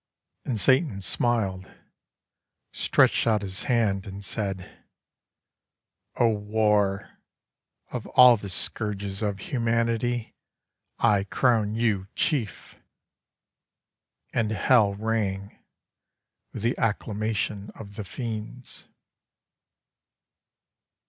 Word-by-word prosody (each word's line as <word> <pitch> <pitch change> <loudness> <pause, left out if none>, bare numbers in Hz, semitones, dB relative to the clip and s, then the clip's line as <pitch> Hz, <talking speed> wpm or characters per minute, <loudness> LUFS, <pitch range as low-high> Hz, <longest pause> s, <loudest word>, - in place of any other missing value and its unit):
And 120 -5 -2
Satan 130 - +3
smiled, 95 -2 0 1.0
stretched - - +2
out 105 -2 +2
his 95 0 -5
hand, 110 -7 +1
and 100 +1 -8
said, 95 -4 -5 1.3
"O 120 - +3
War, 105 -2 0 0.7
of - - -5
all 125 -1 +8
the 100 -2 -7
scourges 100 0 -2
of 100 -2 -1
humanity, 115 +1 -1 0.6
I 100 -2 +3
crown 110 -1 +1
you 110 -5 0
chief." 130 - -2 1.6
And 110 -3 +1
Hell 110 -2 +3
rang 100 -2 -2 0.9
with - - -7
the 120 +2 +1
acclamation 105 -1 -2
of 100 -2 -10
the 105 - -5
Fiends. 115 +3 -7
105 Hz, 85 wpm, -26 LUFS, 100-115 Hz, 1.6 s, all